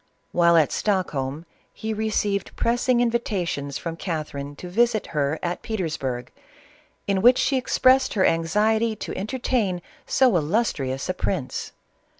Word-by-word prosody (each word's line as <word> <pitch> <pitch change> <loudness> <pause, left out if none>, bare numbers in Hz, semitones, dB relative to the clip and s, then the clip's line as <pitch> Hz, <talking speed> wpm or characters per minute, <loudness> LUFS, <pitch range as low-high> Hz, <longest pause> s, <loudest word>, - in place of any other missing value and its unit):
While 170 -1 +4
at 155 -3 +3
Stockholm 160 -7 -1 0.3
he 220 0 -4
received 210 -2 -1
pressing 240 +1 +2
invitations 185 - -1
from 165 -1 -5
Catherine 150 -5 -4
to 180 - -8
visit 220 +3 +2
her 145 0 0
at 175 0 -2
Petersburg, 155 - -3 0.7
in 195 -1 +1
which 245 +4 +7
she 275 - +1
expressed 260 0 +3
her 190 - +3
anxiety 215 +7 +2
to - - -6
entertain 215 -3 -1 0.3
so 255 -6 +4
illustrious 145 - -1
a 185 - 0
prince. 180 -7 -3
190 Hz, 130 wpm, -24 LUFS, 155-225 Hz, 0.7 s, which